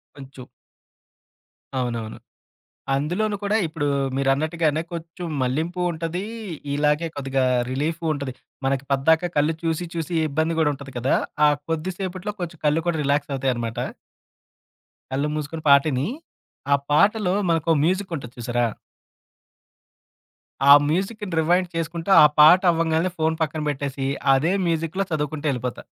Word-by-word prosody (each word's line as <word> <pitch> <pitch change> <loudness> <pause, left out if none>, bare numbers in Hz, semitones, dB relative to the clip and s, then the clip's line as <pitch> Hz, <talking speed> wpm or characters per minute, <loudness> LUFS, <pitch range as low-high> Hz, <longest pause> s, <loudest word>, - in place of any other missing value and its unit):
కొంచెం 135 -2 -11 1.3
అవునవును. 115 -3 -3 0.8
అందులోను 180 +9 -1
కూడా 205 +1 0
ఇప్పుడు 155 -2 -2 0.3
మీరన్నట్టుగానే 155 +3 +1
కొంచెం 170 +2 -7 0.2
మల్లింపు 160 +8 -1
ఉంటది 165 +3 -4 0.5
ఇలాగే 150 +3 +1
కొద్దిగా 135 -1 -1 0.3
రిలీఫు 155 +6 -2
ఉంటది. 140 -3 -5 0.3
మనకి 135 0 0
పద్దాకా 160 +6 +3
కళ్ళు 150 +2 +2
చూసి 165 +1 -1
చూసి 165 +1 -3 0.2
ఇబ్బంది 160 +3 0
కూడా 150 -2 +3
ఉంటది 135 -1 -11
కదా! 125 +2 +1 0.3
ఆ - - +6 0.2
కొద్దిసేపట్లో 185 +4 -3
కొంచెం 170 -2 -6
కళ్ళు 150 +2 +2
కూడా 170 - +1
రిలాక్స్ 145 0 0
అవుతాయన్నమాట. 120 -4 -2 1.3
కళ్ళు 140 +3 0
మూసుకొని 155 +1 -4
పాటిని. 140 0 +4 0.7
ఆ - - +8 0.2
పాటలో 200 +4 +3 0.2
మనకో 165 0 +1
మ్యూజికుంటది 170 -8 -2
చూసారా? 120 0 0 2.0
ఆ - - +11 0.2
మ్యూజిక్‌ని 195 +3 -2
రివైండ్ 175 +3 +2
చేసుకుంటూ 165 +3 -3
ఆ - - +9
పాట 160 +5 +8
అవ్వంగానే 165 +2 +1
ఫోను 160 0 0
పక్కన 155 0 -2
పెట్టేసి 140 -1 -3 0.3
అదే 155 +7 +2
మ్యూజిక్‌లో 165 +4 -1
చదువుకుంటూ 150 0 -2
ఎళ్ళిపోతా. 125 -1 -4
155 Hz, 120 wpm, -23 LUFS, 140-170 Hz, 2.0 s, ఆ